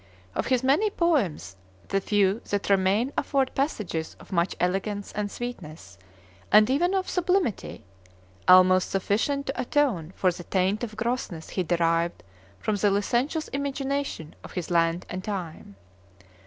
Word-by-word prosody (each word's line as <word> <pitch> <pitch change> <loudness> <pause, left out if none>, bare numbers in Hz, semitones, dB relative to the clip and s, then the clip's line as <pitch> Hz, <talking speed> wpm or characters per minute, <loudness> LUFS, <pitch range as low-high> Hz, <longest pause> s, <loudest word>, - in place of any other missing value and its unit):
Of - - -2
his 255 -1 +2
many 295 +12 +3
poems, 225 - 0 0.3
the 195 0 +1
few 205 +1 +2
that 205 0 -1
remain 200 +7 +2
afford 270 -2 0
passages 210 - -2
of - - -15
much 170 0 +1
elegance 195 +3 -1
and 210 0 -3
sweetness, 160 - -8 0.5
and 210 0 +7
even 350 +8 +2
of 380 -1 0
sublimity, 360 - -1 0.6
almost 185 0 +6
sufficient 225 +9 0
to 270 - -2
atone 240 - 0
for 185 - +2
the 175 0 -8
taint 190 +5 0
of 220 -2 -5
grossness 225 -8 -3
he 185 - -2
derived 170 - 0 0.3
from 205 - -1
the 205 +1 +3
licentious 240 +10 0
imagination 275 - -3
of - - -11
his 180 -1 -4
land 170 +1 +2
and 185 0 -5
time. 175 - -6
205 Hz, 140 wpm, -26 LUFS, 180-265 Hz, 0.6 s, and